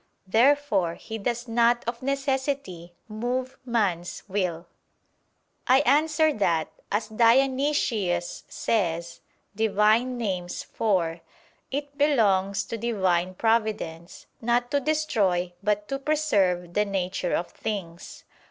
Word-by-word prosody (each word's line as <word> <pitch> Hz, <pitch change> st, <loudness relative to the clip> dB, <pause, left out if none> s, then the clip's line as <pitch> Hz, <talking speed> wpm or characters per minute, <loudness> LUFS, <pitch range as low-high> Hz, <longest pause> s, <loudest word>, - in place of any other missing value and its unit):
Therefore 220 Hz, -5 st, +2 dB
He 225 Hz, 0 st, -7 dB
does 240 Hz, +3 st, -2 dB
not 235 Hz, +1 st, +3 dB
of 235 Hz, 0 st, -3 dB
necessity 270 Hz, -, -2 dB
move 250 Hz, +4 st, -3 dB
man's 200 Hz, -8 st, -1 dB
will. 180 Hz, -4 st, -2 dB, 1.0 s
I 260 Hz, +2 st, +6 dB
answer 310 Hz, +1 st, +3 dB
that, 170 Hz, -, 0 dB, 0.2 s
As 210 Hz, +2 st, 0 dB
Dionysius 230 Hz, -6 st, +2 dB
says 170 Hz, -5 st, -1 dB, 0.4 s
(Div. 220 Hz, -1 st, 0 dB
Nom. 230 Hz, +4 st, +3 dB
iv) 180 Hz, -3 st, -1 dB, 0.5 s
"it 285 Hz, +1 st, -5 dB
belongs 200 Hz, -9 st, +2 dB
to 230 Hz, -, -5 dB
Divine 185 Hz, -5 st, 0 dB
providence, 215 Hz, -7 st, -1 dB, 0.2 s
not 240 Hz, +2 st, +1 dB
to 285 Hz, -, +3 dB
destroy 215 Hz, -, 0 dB
but 210 Hz, 0 st, 0 dB
to 275 Hz, -, -2 dB
preserve 205 Hz, -, +1 dB
the 210 Hz, -, +3 dB
nature 185 Hz, -2 st, -1 dB
of 175 Hz, -, -3 dB
things." 185 Hz, -6 st, -6 dB
215 Hz, 105 wpm, -26 LUFS, 185-255 Hz, 1.0 s, I